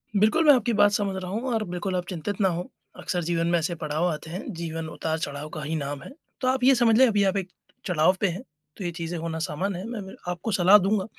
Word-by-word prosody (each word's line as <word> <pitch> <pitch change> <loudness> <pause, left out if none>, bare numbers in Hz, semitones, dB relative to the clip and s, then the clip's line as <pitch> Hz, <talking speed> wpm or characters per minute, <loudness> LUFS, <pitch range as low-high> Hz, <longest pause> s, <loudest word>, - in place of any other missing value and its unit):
बिल्कुल, 220 +11 +4
मैं 290 - +9
आपकी 245 -2 0
बात 205 -1 +5
समझ 200 -2 0
रहा 180 0 -5
हूँ 240 +4 -2
और 220 - +1
बिल्कुल 180 +2 -3
आप 180 -1 -1
चिंतित 180 +3 -3
न - - +4
हो, 175 -2 +1 0.4
अक्सर 175 -2 -2
जीवन 165 0 0
में 170 0 +3
ऐसे 165 +2 -2
पड़ाव 155 +1 -2
आते 155 0 -5
हैं, 180 +5 -5
जीवन 165 -1 -5
उतार-चढ़ाव 155 -2 -4
का 155 - -4
ही 155 +3 -2
नाम 145 -2 -4
है, - - -9 0.3
तो 255 - 0
आप 260 0 +1
ये 265 +1 +6
समझ 235 -2 +4
लें 260 - +8
अभी 210 -3 +2
आप 195 0 +2
एक 185 -1 -3 0.4
चढ़ाव 180 0 +3
पे 200 - +4
हैं 175 +1 -4 0.4
तो - - -6
ये 175 - -2
चीज़ें 170 +1 -5
होना 160 0 -4
सामान्य 175 +3 -2
है, 190 - -6
मैं 235 -2 -5
मैं 190 0 -9 0.2
आपको 180 +6 -4
सलाह 190 +1 +7
दूँगा। 195 0 +1
180 Hz, 255 wpm, -26 LUFS, 165-205 Hz, 0.4 s, मैं